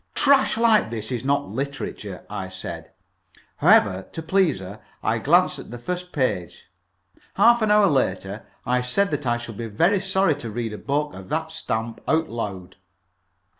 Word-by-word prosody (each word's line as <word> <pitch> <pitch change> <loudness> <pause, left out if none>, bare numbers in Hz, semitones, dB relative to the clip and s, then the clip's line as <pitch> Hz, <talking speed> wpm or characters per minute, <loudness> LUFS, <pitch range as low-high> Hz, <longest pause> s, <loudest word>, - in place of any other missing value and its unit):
"Trash 275 -5 +4
like 225 - +4
this 110 0 -5
is 125 -1 -2
not 140 +1 0
literature," 140 +6 -5
I - - -5
said. - - -7 0.7
However, 95 -1 +4
to 165 - -5
please 180 - +2
her, 95 +3 -9 0.2
I - - +1
glanced - - +3
at - - -10
the 120 - -7
first 180 +8 -5
page. 125 - -2 0.7
Half 235 0 +5
an 215 - +2
hour 210 0 +6
later 105 - -1 0.2
I 125 0 +1
said 200 +11 +1
that 140 - -2
I 120 0 +2
should 115 -3 -8
be 115 - -4
very 170 - +2
sorry 190 -3 +2
to 120 -5 -6
read 115 0 -4
a 105 - -7
book 145 +1 -1
of 95 -1 -10
that 160 +1 -2
stamp 115 -6 -3
out 160 0 +1
loud. 100 -7 -5
135 Hz, 170 wpm, -23 LUFS, 110-180 Hz, 0.7 s, hour